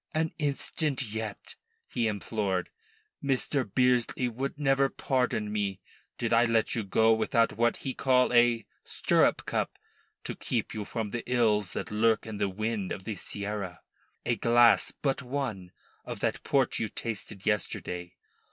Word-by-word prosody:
"An 160 0 0
instant 145 -1 0
yet," 110 -2 -5 0.3
he 120 -2 0
implored. 100 -3 -1 0.5
"Mr. 135 0 +1
Bearsley 125 +1 +2
would 135 +5 -4
never 135 -1 +3
pardon 125 -7 0
me 100 -2 -1 0.4
did 115 -1 0
I 115 +1 +6
let 115 -1 +2
you 115 - 0
go 110 +3 +4
without 115 +1 +2
what 120 +1 +2
he 135 - -4
call 125 -1 +3
a 120 -2 +4 0.2
stirrup - - +2
cup - - -2 0.5
to - - -4
keep - - -2
you 105 -1 -4
from 110 -1 -3
the 120 - -2
ills 105 -5 +2
that - - -4
lurk 110 +1 +2
in 110 -2 -6
the 100 - +1
wind 110 0 -2
of 95 - -4
the 110 +1 -4
Serra. 100 -4 -4 0.4
A 120 - +1
glass 120 +1 +5
but 140 -1 -1
one 125 -9 -4 0.3
of - - -6
that - - 0
Port 135 -3 +1
you 110 - 0
tasted 110 -3 -5
yesterday. 90 -4 -2
115 Hz, 150 wpm, -29 LUFS, 105-125 Hz, 0.5 s, I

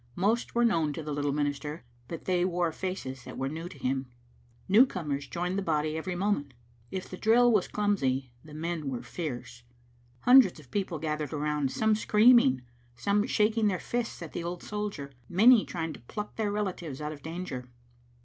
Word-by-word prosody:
Most 215 +7 0
were 240 0 +4
known 165 -9 +2
to 160 - -5
the 150 0 -4
little 145 0 0
minister, 145 +1 -2 0.2
but 165 - -7
they 180 -1 +2
wore 175 -2 +1
faces 155 -8 -5
that - - -8
were 135 - -1
new 165 +4 -5
to - - -12
him. 130 0 -1 0.6
Newcomers 180 - +3
joined 180 +2 -2
the - - -2
bod)' 155 -5 0
every 160 +4 -3
moment. 175 -9 -1 0.3
If 190 -1 -5
the 185 - -8
drill 240 +4 +5
was 210 -5 +2
clumsy 135 -12 0
the 150 -1 -12
men 160 -2 -3
were 125 -3 -4
fierce. 120 -7 -6 0.6
Hundreds 250 -10 +6
of 140 -5 -17
people 190 -5 -1
gathered 150 -1 -3
around, 150 -2 0
some 220 +6 +2
screaming, 215 - +5 0.3
some 200 - +1
shaking 215 -1 +2
their 190 -3 +1
fists 240 -6 -3
at 165 - -9
the 170 - -3
old 175 +1 -5
soldier, 205 -10 -4 0.2
many 220 +5 +6
trying 165 -2 -4
to - - -11
pluck 210 - -7
their 215 -2 -1
relatives 180 -9 -3
out 150 0 -3
of 150 -2 -9
danger. 160 -7 -6
170 Hz, 180 wpm, -29 LUFS, 145-205 Hz, 0.6 s, Hundreds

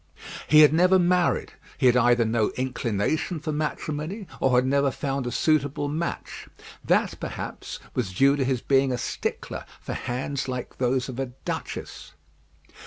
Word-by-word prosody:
He 155 0 +7
had 150 0 +7
never 180 +3 +5
married; 180 0 +2 0.2
he 135 - 0
had 125 -1 +6
either 120 -1 +4
no 110 -1 +1
inclination 130 - -1
for 155 +1 -3
matrimony, 155 +5 -3
or 130 -1 +3
had 125 - +3
never 140 +1 +2
found 135 -1 -3
a - - -2
suitable 145 -1 +1
match. 160 +4 -4 0.4
That, - - +1
perhaps, - - -6 0.2
was 115 -7 -2
due 135 +9 +4
to 140 - 0
his 130 -2 0
being 135 -1 +2
a 125 - 0
stickler - - -4 0.2
for - - -6
hands 130 +3 -3
like 125 -1 -5
those 125 0 +1
of 130 -1 -6
a 135 - -1 0.2
duchess. 75 - -5
135 Hz, 160 wpm, -25 LUFS, 125-155 Hz, 0.4 s, He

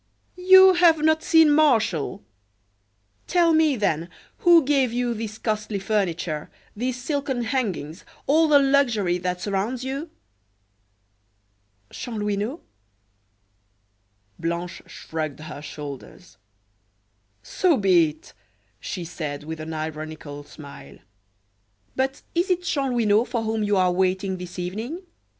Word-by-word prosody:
"You 375 +1 +7
have 335 -3 +4
not 315 0 +3
seen 320 -2 +5
Martial! 225 - +2 1.0
Tell 345 -2 +3
me, 315 -3 +3
then, 170 -6 -1 0.3
who 340 -4 +6
gave 270 -4 +2
you 240 0 -1
this 215 -1 -6
costly 215 -2 -2
furniture, 180 -6 -2 0.3
these 250 +3 -3
silken 270 -2 -2
hangings, 205 - -3 0.2
all 315 +3 +4
the 300 -2 +6
luxury 245 -10 +2
that 180 0 -3
surrounds 210 +5 -2
you?" 275 +5 -4 1.8
"Chanlouineau." 210 - -3 1.8
Blanche 170 +1 -4
shrugged 155 -2 -6
her 155 -2 -8
shoulders. 140 - -10 1.1
"So 350 -6 +1
be 180 -5 +4
it," 150 +1 -15 0.5
she 180 -3 -5
said, 150 -3 -5
with 160 +1 -7
an 155 +1 -6
ironical 155 -2 -6
smile, 140 - -12 1.0
"but 265 +1 -2
is 345 +3 0
it 360 -1 +1
Chanlouineau 245 - +1
for 240 -2 -3
whom 220 0 -1
you 205 -1 +1
are 185 -1 +3
waiting 190 +1 0
this 180 0 -9
evening? 220 - -5
215 Hz, 115 wpm, -24 LUFS, 170-275 Hz, 1.8 s, You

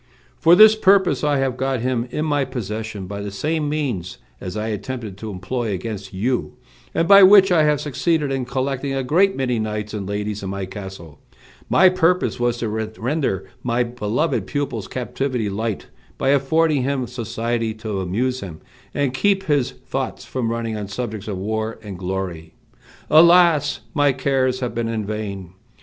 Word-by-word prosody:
"For 170 +2 +6
this 215 +3 +9
purpose 195 -5 +3
I 145 -1 +2
have 135 -2 0
got 130 -2 -1
him 125 -1 -1
in 155 - -2
my 145 -2 +1
possession 110 -5 -5
by 100 +2 -6
the 100 - -4
same 150 +9 -2
means 125 - -3 0.2
as 90 +3 -6
I 110 +1 -2
attempted 110 -1 -5
to 110 - -6
employ 105 +5 -3
against 100 0 -5
you; 120 +7 -1 0.4
and 165 - +2
by 200 0 +9
which 195 0 +8
I 160 -3 +4
have 150 -1 +2
succeeded 150 +1 0
in 135 -2 -1
collecting 135 +2 -2
a 135 - -1
great 185 +9 +3
many 125 -3 -1
knights 105 -1 -3
and 100 -2 -4
ladies 105 0 -3
in 95 - -5
my 100 0 -3
castle. 95 -6 -9 0.5
My 185 - +6
purpose 180 -6 +2
was 120 0 +1
to 115 -2 -2 0.3
render 120 - -1 0.2
my 125 0 +1
beloved 120 +5 -1
pupil's 135 -8 -3
captivity 125 -3 -2
light, 110 +1 -3 0.3
by 135 - 0
affording 145 +2 +2
him 130 0 -1
society 115 -1 -3
to 110 -3 -4
amuse 125 +8 -1
him, 85 -5 -8 0.4
and 140 -3 0
keep 195 +6 +2
his 145 -7 +1
thoughts - - -5
from 125 -3 -2
running 115 -1 -2
on 105 -2 -4
subjects 110 -1 -5
of 100 -3 -3
war 110 +3 -3
and 100 -4 -8
glory. 90 -3 -4 0.6
Alas! 170 -2 +5
my 145 -3 +3
cares 130 -1 0
have 125 -2 -2
been 115 0 -2
in 110 -2 -2
vain! 100 -4 -5
120 Hz, 170 wpm, -21 LUFS, 105-145 Hz, 0.6 s, this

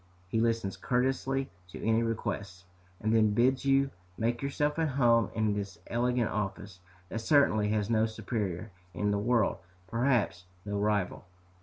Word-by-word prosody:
He 110 +2 +1
listens 115 -4 0
courteously 135 +1 0 0.2
to 90 - -9
any 115 0 +3
requests, 100 -5 -3 0.3
and 110 +1 +1
then 110 -2 +4
bids 130 +4 +3
you 135 0 +3 0.3
make 115 +1 0
yourself 145 +2 0
at 160 - +2
home 115 -3 +4
in 110 -2 +1
this 100 -2 -4
elegant 120 0 0
office, 100 -2 -4 0.3
that 115 - -3
certainly 110 -7 +3
has 105 -1 0
no 110 -1 +2
superior 110 -3 -3 0.2
in 105 0 0
the 100 - +1
world, 115 0 +2 0.3
perhaps 115 -6 +1 0.2
no 100 0 -2
rival. 100 -3 0
110 Hz, 150 wpm, -30 LUFS, 105-125 Hz, 0.3 s, then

